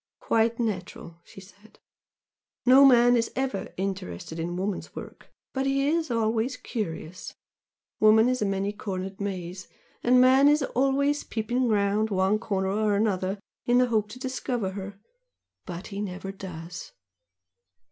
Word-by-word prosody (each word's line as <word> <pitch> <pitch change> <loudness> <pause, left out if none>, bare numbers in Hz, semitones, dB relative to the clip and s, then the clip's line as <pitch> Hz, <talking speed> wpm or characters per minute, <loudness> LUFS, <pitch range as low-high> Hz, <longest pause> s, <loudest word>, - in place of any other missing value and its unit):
"Quite 230 +1 +1
natural!" 185 -6 -4
she - - -14
said 200 +3 -19 0.9
"No 260 +2 +8
man 245 -2 +6
is 230 -1 0
ever 260 -7 -2
'interested' 165 - -4
in 175 +2 -3
woman's 195 +1 -4
work, - - -10 0.2
but 265 0 -1
he 275 +1 +1
is 320 +1 0
always 230 +2 0
'curious.' 180 -7 -6 0.6
Woman 220 +2 +6
is 255 -1 0
a - - +2
many 195 +1 -1
cornered 190 -1 -5
maze 185 -2 -5 0.3
and 250 +1 +4
man 260 +2 +6
is 295 0 +4
always 275 +3 +1
peeping 240 +3 -1
round 210 0 +1
one 195 +1 +2
corner 190 -4 -1
or 210 +1 +1
another 195 -2 0 0.3
in 245 0 +4
the 250 0 +3
hope 215 -2 +1
to 220 - -9
discover 255 -5 -3
her 195 +1 -7 0.7
but 180 0 -6
he 200 - -3
never 195 -1 -5
does!" 175 -3 -8
210 Hz, 145 wpm, -26 LUFS, 190-250 Hz, 0.9 s, No